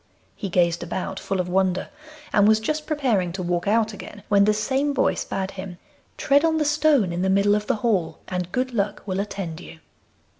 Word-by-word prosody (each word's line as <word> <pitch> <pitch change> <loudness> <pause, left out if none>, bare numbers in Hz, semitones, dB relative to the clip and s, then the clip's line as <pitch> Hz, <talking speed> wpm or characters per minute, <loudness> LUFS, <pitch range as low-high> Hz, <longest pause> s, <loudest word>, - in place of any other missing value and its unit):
He 195 - -5
gazed 170 -1 +2
about, 185 +2 -4
full 195 - -3
of 180 - -1
wonder, 185 0 0 0.4
and 205 -1 +5
was 220 0 +5
just 305 +7 -3
preparing 245 - 0
to 185 0 -4
walk 175 +1 -1
out 220 +1 +2
again 205 0 -10
when 200 -1 +5
the 210 - +4
same 275 +6 0
voice 270 - +1
bade 190 0 -3
him: 190 -2 -8 0.4
'Tread 285 +1 +3
on 325 -1 +2
the 305 - +1
stone 295 - +3
in 175 - -2
the 190 - +1
middle 200 +1 +3
of 210 0 -1
the - - +2
hall, 175 -8 +1
and 180 -1 -3
good 255 +2 -1
luck 205 -2 -1
will 190 -1 -2
attend 195 -5 -4
you. 165 - -11
200 Hz, 210 wpm, -23 LUFS, 180-235 Hz, 0.4 s, and